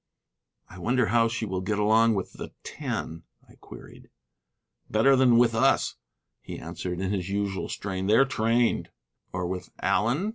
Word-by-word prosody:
"I 95 - -13
wonder 125 +7 +1
how 115 -1 +4
she 115 0 -3
will 95 -3 -3
get 105 +2 -2
along 110 +2 +4
with 95 - -4
the - - -9
Ten?" 80 +1 -5 0.3
I - - -19
queried. - - -13 0.8
"Better 125 +6 +4
than 125 -3 +5
with 120 -1 +4
us," 110 - +2 0.5
he - - -8
answered 90 -1 -5
in 95 0 -2
his 95 -2 -2
usual 100 -1 -2
strain. 95 -1 -4
"They're 110 +6 +5
trained." 115 -1 +1 0.4
"Or 90 0 -3
with 90 +1 -5
Allen?" 130 - +1
110 Hz, 155 wpm, -26 LUFS, 95-115 Hz, 0.8 s, than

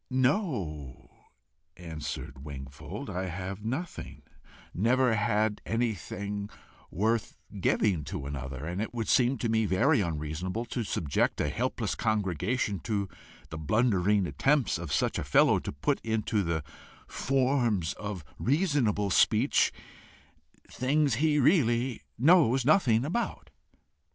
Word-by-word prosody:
"No," 125 - -1 0.7
answered 80 -5 -6
Wingfold; 70 -2 -8
"I 90 +1 -3
have 95 +3 -5
nothing, 135 +10 -5 0.5
never 125 +5 +2
had 105 0 +1
anything 105 -2 -3 0.4
worth 110 +5 -1 0.2
giving 95 -3 +1
to 70 - -5
another; 70 -1 -5
and 90 +4 -3
it 110 - -4
would 115 -2 -2
seem 125 +1 +3
to 115 - -2
me 110 -1 +2
very 115 +8 +3
unreasonable 85 +6 -3
to 120 0 -3
subject 75 -8 0
a - - +1
helpless - - -2
congregation 105 - -1
to 100 +1 -2 0.4
the 80 - -5
blundering 100 - +2
attempts 130 - +1
of 85 -3 -6
such - - +1
a - - -2
fellow - - +4
to - - -5
put 75 +1 -1
into 110 -1 0
the 85 -4 -1 0.4
forms 125 - +1
of 100 -7 -6
reasonable 130 - +1
speech 115 +8 +4 1.0
things 140 +2 +1
he 155 -1 +3
really 130 - +2 0.2
knows 135 -3 +4
nothing 130 - +4
about." 210 +11 -3
110 Hz, 120 wpm, -29 LUFS, 90-125 Hz, 1.0 s, fellow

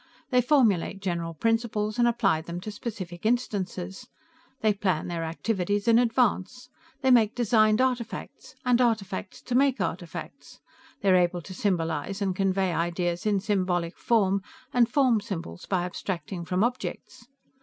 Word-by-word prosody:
They 250 -1 +5
formulate 225 - +2
general 170 -3 -3
principles, 225 +1 0
and 240 - +5
apply 220 -9 +2
them 170 +2 -6
to 215 - -6
specific 185 -6 -7
instances. 210 -2 -2 0.5
They 215 -2 +3
plan 185 -5 -1
their 170 -1 -3
activities 200 +4 -1
in 230 0 +6
advance. 245 0 0 0.3
They 265 -1 +3
make 225 -3 +5
designed 215 -2 +3
artifacts, 250 -3 -3
and 250 0 +4
artifacts 205 -5 -1
to 250 - -4
make 270 -1 +3
artifacts. 175 -2 -5 0.4
They 195 - +3
are - - +6
able 175 -1 +2
to 185 - -9
symbolize, 180 -1 -1
and 195 -3 -1
convey 190 -1 +1
ideas 175 +2 -1
in 200 -2 +2
symbolic 185 -4 0
form, 200 -4 +2 0.3
and 240 -1 +4
form 250 -5 +3
symbols 165 - -6
by 185 -3 0
abstracting 180 0 -4
from 180 +3 +1
objects. 240 0 -4
200 Hz, 145 wpm, -27 LUFS, 180-235 Hz, 0.5 s, in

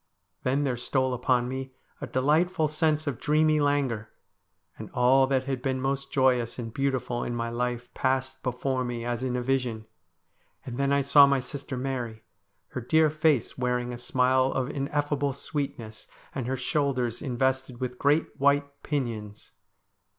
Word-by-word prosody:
Then 135 +3 +1
there 130 -4 0
stole 130 +1 0
upon 125 0 +1
me 130 0 -5 0.3
a - - -4
delightful 155 +5 +2
sense 155 0 +1
of 140 -6 -3
dreamy 155 0 +3
languor, 140 -7 0 0.7
and - - -8
all 130 +2 +5
that 135 -1 +1
had 130 -1 -3
been 130 0 -1
most 135 +1 -2
joyous 125 -3 +2
and 115 -3 -5
beautiful 130 -3 -1
in 120 - -3
my 115 0 -2
life 120 0 -3
passed 130 0 -1
before 130 +1 -1
me 120 -1 -4
as 120 0 -2
in 130 -1 -1
a 125 - -1
vision; 125 -4 -1 0.8
and 125 0 -6
then 140 0 +2
I 140 0 +3
saw 140 +1 +7
my 140 -1 +2
sister 135 +1 -5
Mary, 125 -4 -4 0.5
her 130 - -5
dear 155 +5 +3
face 155 -6 +1
wearing 125 -1 -1
a - - -5
smile 130 +1 +2
of 130 +1 -1
ineffable 145 0 -1
sweetness, 130 -7 -5 0.3
and 130 -4 -3
her 130 +1 -1
shoulders 130 -3 -1
invested 130 -1 -1
with 125 -1 -4
great 145 +3 +3
white 140 0 +2
pinions. 115 -8 -4
130 Hz, 160 wpm, -27 LUFS, 125-140 Hz, 0.8 s, saw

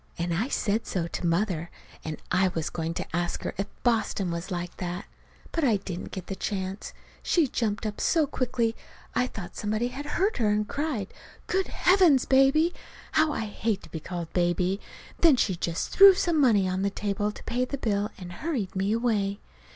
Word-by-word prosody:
And 170 0 -1
I 205 +9 0
said 220 -5 0
so 175 -3 -1
to 170 +1 -3
Mother; 170 -1 0 0.3
and 155 -1 -4
I 180 +1 +4
was 160 -1 -2
going 165 0 -3
to - - -4
ask 175 0 -1
her - - -3
if 195 - 0 0.2
Boston 220 -6 +1
was 170 +3 -4
like 175 -1 -4
that. 180 +1 -4 0.5
But 330 - -1
I 230 -7 +4
didn't 185 -2 -6
get 185 -2 -6
the 195 - -5
chance. 190 0 -4 0.3
She 335 -5 +2
jumped 220 -3 -1
up 210 -1 -3
so 320 -3 +3
quick 240 -4 -1 0.4
I 250 - +2
thought 200 -7 -8
something 215 +3 -1
had 285 +3 -7
hurt 400 +4 +1
her, 225 -4 +2
and 210 0 +1
cried, 280 -9 -3 0.3
"Good 380 +1 0
Heavens, 355 -8 +4
Baby!" 275 +6 +4 0.4
(How 310 -1 +3
I 225 - -2
hate 215 0 -2
to - - -13
be 160 - -4
called 170 0 -6
"Baby"!) 180 +2 +1 0.4
Then 325 -5 +7
she 200 -6 +1
just 170 0 -2
threw 395 -1 +9
some 340 -5 +2
money 210 -8 +4
on 185 0 -1
to - - -1
the - - +2
table 205 0 -1
to - - -12
pay 245 +2 -1
the 280 +2 -4
bill 210 -4 0
and 180 -2 -8
hurried 235 - -3
me 195 +3 +1
away. 215 -4 0
210 Hz, 195 wpm, -27 LUFS, 180-255 Hz, 0.5 s, threw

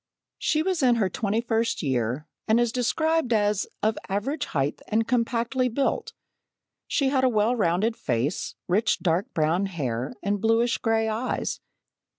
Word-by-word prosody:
She 310 0 +1
was 370 -2 0
in 250 -2 +4
her 210 -5 +1
twenty 215 +2 0
first 230 -3 0
year, 130 +1 -1 0.2
and 220 +1 +4
is 240 -1 +2
described 315 +4 +1
as 205 -2 +2 0.2
"of 220 +1 +1
average 210 +11 -1
height 140 0 -2
and 225 +1 +1
compactly 240 +1 +1
built." 270 +4 -1 0.7
She 275 -2 +1
had 265 -1 +1
a 260 - +5
well 220 +1 +2
rounded 210 +2 +1
face, 125 - -2
rich 205 +5 +1
dark 185 +8 0
brown 165 +5 +2
hair, 130 - -3
and 200 0 0
bluish 225 +1 +2
grey 225 -1 +1
eyes. 220 +3 -2
225 Hz, 155 wpm, -26 LUFS, 185-245 Hz, 0.7 s, a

